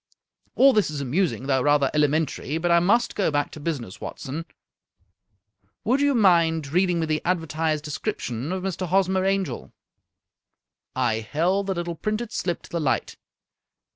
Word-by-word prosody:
All 270 +1 +6
this 210 -7 +2
is 150 -2 -4
amusing, 140 +1 -1
though 135 -1 +2
rather 145 -1 +3
elementary, 150 0 0
but 175 +1 0
I 170 - +6
must 210 +8 +2
go 200 - +1
back 145 -1 -1
to - - -9
business, 140 - -4
Watson. 155 +5 -6 1.4
Would 260 +5 +2
you 285 -1 +3
mind 165 -8 +3
reading 180 -1 +2
me - - +1
the 155 -1 -1
advertised 160 -3 -1
description 150 - -4
of 185 0 -3
Mr. 185 -1 -3
Hosmer 190 +1 +2
Angel? 195 -1 -1 0.7
" - - -58 0.2
I 110 - -1
held 175 - 0
the 190 - -1
little 175 0 -3
printed 215 +6 -3
slip 175 -1 -2
to - - -14
the 170 - -2
light. 135 -3 -1
165 Hz, 160 wpm, -24 LUFS, 150-190 Hz, 1.4 s, All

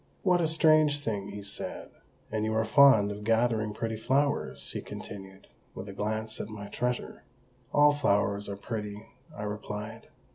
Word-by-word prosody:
"What 180 -2 +4
a 165 - +2
strange 155 -2 +4
thing!" 105 -6 -3
he 100 0 -7
said. 100 - -5 0.4
"And 110 -1 -1
you 110 0 0
are 110 0 +2
fond 110 -3 +6
of 105 +1 -7
gathering 115 -1 +2
pretty 110 +1 -3
flowers?" 140 +6 0
he - - -4
continued, 95 -1 -9 0.3
with 95 - -7
a 100 - -7
glance 110 +2 -2
at - - -6
my 105 -1 -8
treasure. 125 +3 -3 0.5
"All 145 0 +6
flowers 100 -7 +1
are 100 - -5
pretty," 105 -1 -5 0.3
I 105 - -4
replied. 105 +1 -6
110 Hz, 160 wpm, -29 LUFS, 105-125 Hz, 0.5 s, fond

